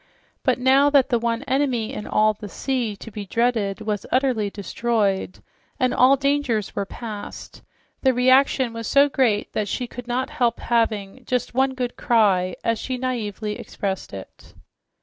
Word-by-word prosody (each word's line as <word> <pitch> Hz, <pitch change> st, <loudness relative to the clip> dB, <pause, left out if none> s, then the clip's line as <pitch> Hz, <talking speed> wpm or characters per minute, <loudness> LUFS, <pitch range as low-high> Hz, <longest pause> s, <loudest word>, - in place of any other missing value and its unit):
But 255 Hz, -3 st, +2 dB
now 265 Hz, +3 st, +4 dB
that 280 Hz, -2 st, +4 dB
the 240 Hz, -3 st, +2 dB
one 235 Hz, +2 st, -1 dB
enemy 265 Hz, -5 st, 0 dB
in 210 Hz, -, -6 dB
all 215 Hz, 0 st, +3 dB
the 210 Hz, 0 st, -9 dB
sea 240 Hz, +1 st, -2 dB
to 225 Hz, +3 st, -11 dB
be 210 Hz, 0 st, -6 dB
dreaded 225 Hz, -3 st, 0 dB
was 210 Hz, -2 st, -2 dB
utterly 250 Hz, -6 st, +1 dB
destroyed 200 Hz, -1 st, -1 dB, 0.4 s
and 255 Hz, -1 st, +2 dB
all 260 Hz, +2 st, +6 dB
dangers 275 Hz, -6 st, 0 dB
were 200 Hz, -, -2 dB
past, 215 Hz, -3 st, -8 dB, 0.4 s
the 265 Hz, -, +4 dB
reaction 255 Hz, 0 st, +3 dB
was 230 Hz, -1 st, -5 dB
so 280 Hz, +1 st, +5 dB
great 240 Hz, -7 st, 0 dB
that 210 Hz, -, -1 dB
she 250 Hz, +5 st, -2 dB
could 245 Hz, 0 st, -9 dB
not 250 Hz, +2 st, -2 dB
help 235 Hz, -2 st, 0 dB
having 225 Hz, 0 st, -1 dB
"just 250 Hz, -1 st, -1 dB
one 265 Hz, +1 st, +1 dB
good 250 Hz, -1 st, -3 dB
cry," 190 Hz, -6 st, +2 dB
as 230 Hz, -1 st, 0 dB
she 255 Hz, -1 st, -3 dB
naively 220 Hz, -4 st, -3 dB
expressed 195 Hz, -2 st, -4 dB
it. 95 Hz, -1 st, -11 dB
235 Hz, 165 wpm, -23 LUFS, 210-255 Hz, 0.4 s, all